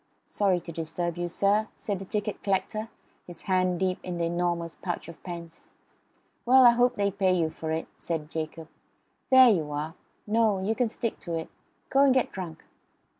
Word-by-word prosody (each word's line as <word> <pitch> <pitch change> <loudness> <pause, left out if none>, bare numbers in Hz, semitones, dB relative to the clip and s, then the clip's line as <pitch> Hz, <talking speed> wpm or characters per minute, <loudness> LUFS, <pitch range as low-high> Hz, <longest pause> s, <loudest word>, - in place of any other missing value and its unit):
"Sorry 195 -3 +1
to 170 - -8
disturb 165 +1 -3
you, 175 0 -1
sir," 200 +5 +2
said 200 -3 -3
the 195 - -7
ticket 210 +1 -3
collector, 205 +3 -1 0.4
his 175 -2 -11
hand 185 -2 +1
deep 185 -1 0
in 180 -1 -5
the 170 - -1
enormous 170 -1 -1
pouch 175 -4 -5
of 170 - -11
pence. 170 -2 -9 0.7
"Well, 255 +1 +7
I 240 - +10
hope 245 +1 +3
they 200 -1 +1
pay 190 -1 +2
you 165 -3 +1
for 160 0 -5
it," 160 +1 -2
said 160 -3 -3
Jacob. 160 0 -5 0.6
"There 260 -2 +8
you 160 -6 -1
are. 150 +2 -3 0.3
No. 220 -1 +2
You 190 +4 0
can 240 0 0
stick 230 0 -3
to 170 -2 -4
it. 160 0 -5 0.4
Go 270 - +4
and 275 -2 +5
get 260 - +2
drunk." 175 -4 -7
185 Hz, 185 wpm, -27 LUFS, 165-210 Hz, 0.7 s, I